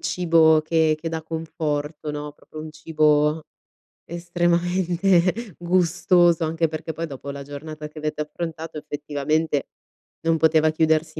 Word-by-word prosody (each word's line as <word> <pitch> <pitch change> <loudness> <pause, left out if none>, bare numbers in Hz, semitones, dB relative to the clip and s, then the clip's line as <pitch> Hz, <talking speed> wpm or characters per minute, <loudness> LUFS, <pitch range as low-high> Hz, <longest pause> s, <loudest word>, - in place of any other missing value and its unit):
cibo 160 -3 +4
che 160 -1 +2
che 165 - -4
dà 160 -1 -3
conforto, 155 -2 -3
no, 150 0 -5
proprio 155 +1 -12
un 155 0 -8
cibo 155 -1 +2 0.6
estremamente 175 +3 +1
gustoso, 175 -1 +3
anche 165 0 0
perché 160 0 -5
poi 165 +2 -3
dopo 140 -1 -8
la 140 0 -7
giornata 150 +2 -8
che 150 - -18
avete 150 0 -3
affrontato 160 +1 -5
effettivamente, 150 0 -1 0.5
non 165 0 +2
poteva 160 0 +4
chiudersi 155 0 +1
160 Hz, 130 wpm, -23 LUFS, 150-170 Hz, 0.6 s, cibo